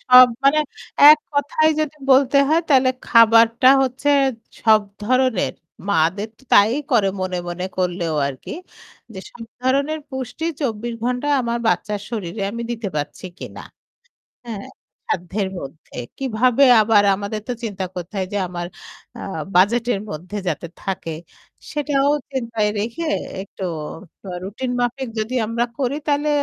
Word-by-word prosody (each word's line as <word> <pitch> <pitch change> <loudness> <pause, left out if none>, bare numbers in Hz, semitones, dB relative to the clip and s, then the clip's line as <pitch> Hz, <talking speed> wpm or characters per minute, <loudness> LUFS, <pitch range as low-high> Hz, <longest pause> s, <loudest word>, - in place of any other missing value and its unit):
সব 250 0 +8 0.2
মানে 280 +2 +5 0.5
এককথায় 305 +1 +2
যদি 305 -1 -2
বলতে 270 +1 +5
হয় 320 +2 +4
তাইলে 265 -3 +5 0.2
খাবারটা 230 +1 +6
হচ্ছে 265 +2 -1 0.5
সব 220 -1 +6 0.2
ধরনের 255 -1 +1 0.4
মা'দের 200 +4 +1
তো - - -23
তাই 205 +3 +6 0.2
করে 220 -6 +3
মনে, 185 -1 -2
মনে 175 +1 -3
করলেও 175 -3 -1
আর 140 - -3
কি। - - -8 0.6
যে 190 - -8
সব 230 - -10 0.2
ধরনের 280 +4 +1
পুষ্টি 265 +3 -5 0.2
২৪ 235 -3 -2
ঘন্টা 250 +4 -1
আমার 235 -1 -1
বাচ্চার 210 -2 0
শরীরে 200 -3 -4
আমি 235 +2 -5
দিতে 225 -3 -3
পারছি 145 +5 -4
কিনা, - - -8 0.8
হ্যাঁ? 215 -4 -6 0.4
সাধ্যের 190 +3 -2
মধ্যে 140 +4 -11 0.2
কীভাবে 255 +1 +3 0.2
আবার 210 -1 +4
আমাদের 205 +2 -5
তো 250 - -1
চিন্তা 200 -4 -3
করতে 180 0 -7
হয় 190 -1 -1
যে 205 - 0
আমার 175 -1 -5 0.5
আ - - -8 0.3
বাজেটের 230 +4 +3
মধ্যে 180 +7 -6
যাতে 170 0 -2
থাকে 185 -4 -4 0.6
সেটাও 285 -1 +1 0.2
চিন্তায় 230 -5 -1
রেখে 235 +10 -3 0.3
একটু 195 0 -9 0.6
ট - - -73 0.2
রুটিন 230 +7 -4
মাফিক 245 +2 -1
যদি 220 +4 -2
আমরা 235 +2 0
করি 270 +1 0
তাহলে 290 +1 +1
230 Hz, 140 wpm, -21 LUFS, 195-260 Hz, 0.8 s, সব